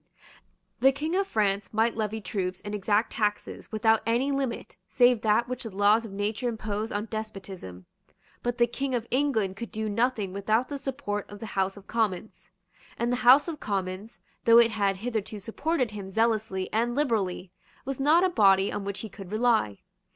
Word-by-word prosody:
The 270 Hz, -, +6 dB
King 310 Hz, +5 st, -3 dB
of 390 Hz, 0 st, +1 dB
France 200 Hz, -, 0 dB
might 225 Hz, +2 st, +1 dB
levy 220 Hz, 0 st, -2 dB
troops 185 Hz, -1 st, -3 dB
and 205 Hz, -, -5 dB
exact 210 Hz, +2 st, +1 dB
taxes 210 Hz, -1 st, -2 dB
without 220 Hz, 0 st, +3 dB
any 245 Hz, +5 st, +1 dB
limit 270 Hz, -4 st, -3 dB
save 245 Hz, -2 st, +4 dB
that 220 Hz, +2 st, +2 dB
which 255 Hz, 0 st, -4 dB
the 225 Hz, -, -5 dB
laws 205 Hz, +3 st, +3 dB
of 220 Hz, -, -8 dB
nature 210 Hz, +5 st, -2 dB
impose 215 Hz, -1 st, -3 dB
on 205 Hz, +1 st, -2 dB
despotism. 195 Hz, -, -7 dB, 0.6 s
But 245 Hz, 0 st, -2 dB
the 240 Hz, -, +5 dB
King 260 Hz, +2 st, -3 dB
of 235 Hz, -2 st, -2 dB
England 230 Hz, -8 st, +1 dB
could 235 Hz, +2 st, -6 dB
do 220 Hz, 0 st, -3 dB
nothing 215 Hz, -3 st, 0 dB
without 215 Hz, +5 st, 0 dB
the 285 Hz, -1 st, -4 dB
support 250 Hz, -7 st, -4 dB
of 205 Hz, -, -9 dB
the 220 Hz, -1 st, -7 dB
House 195 Hz, +1 st, 0 dB
of 200 Hz, -, -13 dB
Commons; 215 Hz, -3 st, -2 dB, 0.5 s
and 235 Hz, +1 st, 0 dB
the 245 Hz, -, +1 dB
House 255 Hz, +5 st, +6 dB
of 320 Hz, -3 st, -5 dB
Commons, 195 Hz, +2 st, -4 dB, 0.3 s
though 230 Hz, 0 st, +7 dB
it 235 Hz, -1 st, +6 dB
had 200 Hz, -3 st, 0 dB
hitherto 220 Hz, -3 st, -3 dB
supported 255 Hz, -, -1 dB
him 200 Hz, -2 st, -7 dB
zealously 215 Hz, -3 st, 0 dB
and 235 Hz, +2 st, +1 dB
liberally, 205 Hz, -10 st, -1 dB, 0.3 s
was 270 Hz, 0 st, -4 dB
not 310 Hz, +6 st, +4 dB
a 375 Hz, -, +3 dB
body 195 Hz, -, +4 dB
on 205 Hz, -, -3 dB
which 200 Hz, 0 st, -4 dB
he 220 Hz, -, -5 dB
could 195 Hz, -2 st, -11 dB
rely. 215 Hz, -, +1 dB
220 Hz, 185 wpm, -27 LUFS, 200-245 Hz, 0.6 s, though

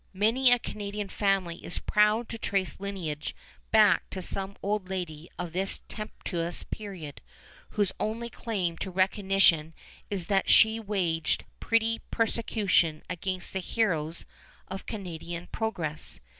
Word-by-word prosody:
Many 230 Hz, +6 st, +4 dB
a 245 Hz, -, +7 dB
Canadian 205 Hz, -3 st, -4 dB
family 195 Hz, -5 st, 0 dB
is -, -, 0 dB
proud 210 Hz, +2 st, +3 dB
to 230 Hz, -, -5 dB
trace 195 Hz, -3 st, -1 dB
lineage 180 Hz, -7 st, -4 dB, 0.3 s
back 210 Hz, -5 st, +5 dB
to 190 Hz, -, -4 dB
some 195 Hz, +2 st, -2 dB
old 200 Hz, -2 st, -1 dB
lady 170 Hz, -4 st, -4 dB
of 175 Hz, -2 st, -4 dB
this 190 Hz, +2 st, +2 dB
tempestuous 175 Hz, -5 st, -4 dB
period, 185 Hz, -9 st, -7 dB, 0.6 s
whose 205 Hz, -3 st, +3 dB
only 225 Hz, +2 st, -1 dB
claim 195 Hz, -8 st, -2 dB
to 190 Hz, -, -3 dB
recognition 185 Hz, -4 st, +3 dB, 0.3 s
is 195 Hz, -4 st, -2 dB
that 195 Hz, +1 st, +2 dB
she 220 Hz, 0 st, +7 dB
waged 180 Hz, -7 st, 0 dB
petty 230 Hz, 0 st, +2 dB
persecution 210 Hz, -8 st, +2 dB
against 185 Hz, +1 st, -2 dB
the 190 Hz, -, 0 dB
heroes 170 Hz, -6 st, 0 dB, 0.4 s
of 190 Hz, +1 st, -7 dB
Canadian 175 Hz, -4 st, -5 dB
progress. 170 Hz, -9 st, -2 dB
195 Hz, 130 wpm, -29 LUFS, 170-215 Hz, 0.6 s, a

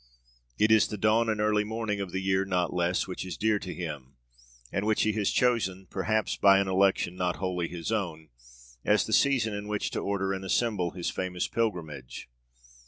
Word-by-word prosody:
It 110 Hz, +1 st, +3 dB
is 110 Hz, -1 st, +6 dB
the 105 Hz, -, -5 dB
dawn 110 Hz, +3 st, +3 dB
and 110 Hz, -1 st, 0 dB
early 105 Hz, 0 st, +2 dB
morning 105 Hz, -1 st, -3 dB
of 95 Hz, -, -4 dB
the 95 Hz, -, -2 dB
year 95 Hz, 0 st, +2 dB
not 90 Hz, -2 st, -1 dB
less 90 Hz, 0 st, 0 dB
which 90 Hz, -, -5 dB
is 95 Hz, -, -6 dB
dear 110 Hz, -1 st, +2 dB
to 90 Hz, -, -6 dB
him 75 Hz, -8 st, -6 dB, 0.6 s
and 100 Hz, -, -1 dB
which 110 Hz, 0 st, +2 dB
he 110 Hz, -, +2 dB
has 105 Hz, -2 st, 0 dB
chosen, 95 Hz, -7 st, +1 dB
perhaps 110 Hz, +2 st, 0 dB
by 100 Hz, -1 st, +6 dB
an 100 Hz, 0 st, +1 dB
election 95 Hz, -1 st, +2 dB
not 90 Hz, -1 st, -1 dB
wholly 90 Hz, -3 st, -2 dB
his 85 Hz, +3 st, -5 dB
own, 85 Hz, -8 st, -3 dB, 0.5 s
as -, -, +3 dB
the -, -, -3 dB
season 125 Hz, -6 st, +3 dB
in 100 Hz, 0 st, -5 dB
which 105 Hz, -1 st, -2 dB
to -, -, -2 dB
order 95 Hz, -1 st, -1 dB
and 95 Hz, 0 st, -5 dB
assemble 95 Hz, -2 st, 0 dB
his 90 Hz, 0 st, -4 dB
famous 90 Hz, -1 st, -2 dB
pilgrimage. 80 Hz, -, -3 dB
95 Hz, 195 wpm, -28 LUFS, 90-110 Hz, 0.6 s, is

